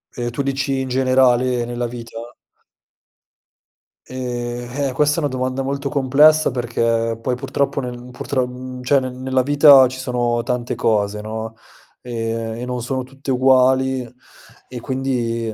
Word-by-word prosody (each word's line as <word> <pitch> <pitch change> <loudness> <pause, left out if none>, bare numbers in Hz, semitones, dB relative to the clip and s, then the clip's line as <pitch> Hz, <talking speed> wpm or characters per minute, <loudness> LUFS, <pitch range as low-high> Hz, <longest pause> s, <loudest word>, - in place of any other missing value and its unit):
Ehm, 120 -1 -3
tu 130 - -3
dici 135 0 -1
in 130 - -3
generale 130 -1 +2
nella 120 0 -3
vita? 115 0 -9 1.7
Ehm, 120 -1 -5 0.2
eh - - -4
questa 150 +3 +2
è - - +2
una 150 - 0
domanda 130 0 -2
molto 140 +1 -3
complessa 145 +3 +4
perché 115 -2 -1
poi 125 +1 -1
purtroppo 135 +2 -2
nel 125 -1 -7
purtro 125 0 -4
cioè 135 +2 +3
nel 130 -1 -5
nella 130 0 -1
vita 140 -1 +7
ci 130 +1 -8
sono 120 -2 -1
tante 125 -1 -2
cose, 105 -1 0
no. 110 +1 -6 0.5
Ehm, 115 -1 -4
e 120 - -5
non 125 -1 -3
sono 130 +2 -3
tutte 135 +1 -7
uguali 130 0 +3 0.6
e 125 - -7
quindi, 120 -3 -2
125 Hz, 145 wpm, -20 LUFS, 120-130 Hz, 1.7 s, vita